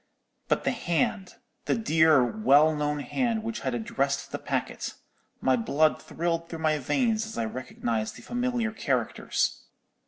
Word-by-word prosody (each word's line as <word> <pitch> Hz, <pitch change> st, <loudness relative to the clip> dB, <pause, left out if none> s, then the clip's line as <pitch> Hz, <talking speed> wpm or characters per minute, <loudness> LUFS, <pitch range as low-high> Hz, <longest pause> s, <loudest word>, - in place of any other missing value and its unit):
"But -, -, +1 dB
the -, -, +2 dB
hand, 185 Hz, -, -1 dB, 0.3 s
the -, -, +2 dB
dear, 160 Hz, -, +4 dB
well 155 Hz, -, +4 dB
known 150 Hz, 0 st, -1 dB
hand, 230 Hz, -, -1 dB
which 225 Hz, 0 st, -3 dB
had 130 Hz, -2 st, -2 dB
addressed 140 Hz, +4 st, -1 dB
the -, -, -3 dB
packet—my 130 Hz, -1 st, -3 dB
blood 150 Hz, +7 st, +2 dB
thrilled 170 Hz, 0 st, -2 dB
through 165 Hz, -, -5 dB
my 155 Hz, -1 st, +1 dB
veins 225 Hz, -, +1 dB
as 220 Hz, -, -8 dB
I 115 Hz, -, 0 dB
recognized 115 Hz, -2 st, -3 dB
the -, -, -12 dB
familiar 245 Hz, -2 st, -1 dB
characters. 220 Hz, -, -1 dB
160 Hz, 145 wpm, -27 LUFS, 140-220 Hz, 0.3 s, dear